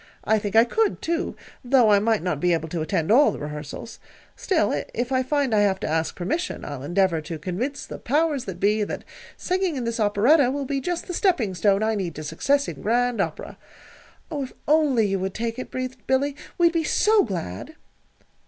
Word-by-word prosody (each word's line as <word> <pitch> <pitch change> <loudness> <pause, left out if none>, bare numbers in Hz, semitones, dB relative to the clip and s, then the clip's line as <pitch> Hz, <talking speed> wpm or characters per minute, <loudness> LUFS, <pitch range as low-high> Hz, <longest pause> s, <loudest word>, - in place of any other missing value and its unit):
"I 220 0 +2
think 205 0 -4
I 225 - +8
could, 425 - 0
too, 335 +2 -2 0.3
though 245 -3 +4
I 205 - +6
might 220 -2 +1
not 165 -6 -1
be 180 +2 +2
able 160 -1 -1
to 165 0 -3
attend 160 +3 -1
all 280 +6 +6
the - - -6
rehearsals. 150 +8 -7 0.4
Still, 320 - 0
if 240 +3 -2
I 260 -1 +2
find 275 -2 0
I 215 - +4
have 195 -2 +2
to - - -2
ask 160 +1 -1
permission, 320 - -3
I'll 145 -3 -6
endeavor 175 +2 +1
to 160 +1 -6
convince 200 - -4
the - - -8
powers 295 0 0
that 180 -2 -6
be 210 +2 +2
that - - -5 0.3
singing 365 -3 -1
in 255 - -3
this 230 0 -3
operetta 235 +7 +4
will 280 +1 -2
be 275 0 -2
just 350 +4 -3
the 360 - -5
stepping 330 - +1
stone 195 +3 +2
I 220 0 +1
need 185 -6 -3
to 155 - -6
success 275 - +1
in - - -7
Grand 245 +2 +1
Opera." - - -5 0.7
"Oh, 295 -3 -2
if - - -10
you - - -21
only 270 -10 +3
would 190 0 -3
take 230 +2 -3
it," - - -6
breathed 255 -3 -6
Billy, 275 +2 +1 0.2
"we'd 340 -1 +4
be 330 -1 +1
so 425 +7 +3
glad!" 165 - -5
230 Hz, 210 wpm, -24 LUFS, 190-280 Hz, 0.7 s, I